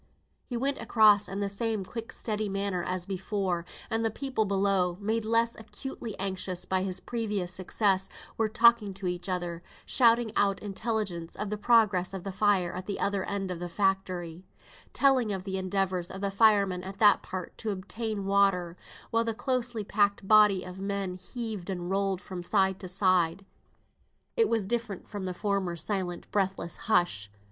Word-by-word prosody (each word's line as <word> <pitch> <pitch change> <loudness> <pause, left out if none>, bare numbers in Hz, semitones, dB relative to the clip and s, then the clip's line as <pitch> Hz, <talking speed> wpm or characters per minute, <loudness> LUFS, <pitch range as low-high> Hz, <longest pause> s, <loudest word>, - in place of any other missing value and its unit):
He 245 - -3
went 275 +3 0
across 210 -2 +5
in 195 +1 -3
the 200 - 0
same 205 0 -2
quick 230 +3 -6
steady 215 -2 -2
manner 195 -2 -1
as 180 0 -2
before, 190 -2 -2 0.2
and 225 0 0
the 225 - +2
people 255 -1 -1
below, 195 -3 +1
made 220 +2 -1
less 230 +1 +2
acutely 230 0 -7
anxious 185 -2 -2
by 190 0 +1
his 185 -1 0
previous 210 -7 -2
success, 190 0 +1 0.3
were 225 -1 +1
talking 230 -3 +4
to 195 0 -7
each 180 +1 -2
other, 175 -2 -2 0.2
shouting 235 -2 +4
out 200 -1 +2
intelligence 200 -5 -3
of 210 0 -4
the - - 0
progress 210 -5 +3
of 185 - -6
the 195 - -4
fire 190 -3 +2
at 185 +1 -6
the 200 - -3
other 200 -1 0
end 195 -2 -3
of 175 - -4
the 175 0 -5
factory, 185 -3 -1 0.5
telling 260 -6 +3
of 190 -2 -3
the 190 -1 -2
endeavours 185 -1 -1
of 190 - -7
the 200 -1 -1
firemen 200 -3 +4
at 190 +1 -7
that 205 -1 +6
part 185 -2 -6
to 225 - -3
obtain 205 +1 -3
water, 195 -3 +2 0.4
while 230 0 +3
the 225 -1 -2
closely 245 -3 -1
packed 200 -1 +1
body 210 -3 +6
of 185 +1 -9
men 195 -1 -2
heaved 205 0 -5
and 180 -1 -3
rolled 195 -1 0
from 185 -2 -7
side 190 +1 +1
to 185 - -6
side. 185 -1 +2 0.9
It 455 - +3
was 225 -4 +1
different 230 -2 -3
from 205 -3 -5
the 185 - -2
former 195 -2 -1
silent 175 +1 -2
breathless 190 -4 -1
hush. 175 - +2
195 Hz, 175 wpm, -29 LUFS, 185-215 Hz, 0.9 s, that